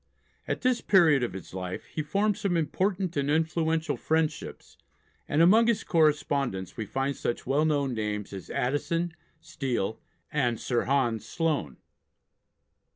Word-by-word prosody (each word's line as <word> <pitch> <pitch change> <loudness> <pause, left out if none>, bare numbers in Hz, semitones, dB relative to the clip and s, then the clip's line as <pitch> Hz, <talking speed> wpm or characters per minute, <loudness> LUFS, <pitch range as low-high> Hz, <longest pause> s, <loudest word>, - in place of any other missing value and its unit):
At - - -2
this 255 -1 +2
period 165 -8 +5
of 120 - -2
his 95 -1 -9
life 90 -1 -5
he 155 - -1
formed 200 +7 +1
some 185 -3 0
important 185 +2 -1
and 140 -1 0
influential 160 +1 +1
friendships, 160 -1 -2 0.5
and 155 +3 +4
among 220 +6 +6
his 230 -2 +1
correspondents 145 - +1
we 110 -3 -4
find 135 +4 -1
such 120 - -3
well 140 +4 +2
known 140 -4 +1
names 105 -2 -3
as 95 -2 -8
Addison, 150 +6 -1 0.3
Steele, 120 -6 -3 0.3
and 120 -2 0
Sir 120 -2 0
Hans 125 -5 +1
Sloane. 150 - -1
145 Hz, 140 wpm, -28 LUFS, 120-165 Hz, 0.5 s, among